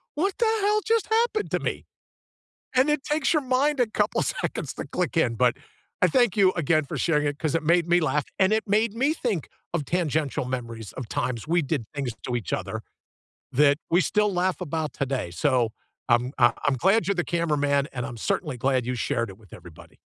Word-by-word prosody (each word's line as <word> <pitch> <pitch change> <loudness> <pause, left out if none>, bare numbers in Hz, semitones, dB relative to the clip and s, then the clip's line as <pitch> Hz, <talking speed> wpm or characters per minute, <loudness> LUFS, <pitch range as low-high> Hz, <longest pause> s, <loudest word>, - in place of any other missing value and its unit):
"What 380 +7 0
the 470 - +3 0.2
hell 420 +1 +3
just 450 -1 +1
happened 445 -1 +1
to - - +1
me?" - - -3 0.9
and 260 +3 +4
it 300 -2 +1
takes 300 +1 +1
your 310 - +2
mind 265 +3 +1
a 245 - +3
couple - - 0
seconds - - -3
to - - -5
click - - -2
in - - +2
but - - +3 0.5
I - - +6
thank 240 -5 +3
you 190 -2 +5
again 155 -2 +1
for - - -5
sharing 150 -3 +1
it 145 0 -3
'cause 155 -2 -1
it 165 - +1
made 170 +2 +3
me 175 +1 +4
laugh, 150 -2 +1 0.2
and 190 +2 +4
it 220 - +1
made 210 +2 +2
me 275 +6 +2
think 220 - -2 0.2
of 150 -5 -1
tangential 155 -6 -1
memories 115 -4 -5
of 125 -4 -7
times 125 +1 -2
we 170 +1 +2
did 140 -5 -2
things 135 -5 -2
to 125 - -2
each 110 -8 -3
other, - - -3 0.7
that 145 +1 +4
we 175 +2 +5
still 210 +5 +1
laugh 180 +1 0
about 160 -3 -3
today, 135 -10 -2
so, 125 +3 +1 0.4
um, 120 +2 +3
uh, 120 -2 +6
I'm 145 - +3
glad 195 - +2
you're 200 - +1
the 175 - 0
cameraman, 145 -4 +1
and 125 -2 -3
I'm 125 -3 -7
certainly 135 - -2
glad 130 0 +1
you 125 - -1
shared 115 -1 -1
it 95 - -11
with 105 -4 -21
everybody. 85 -3 -14
155 Hz, 210 wpm, -25 LUFS, 130-210 Hz, 0.9 s, I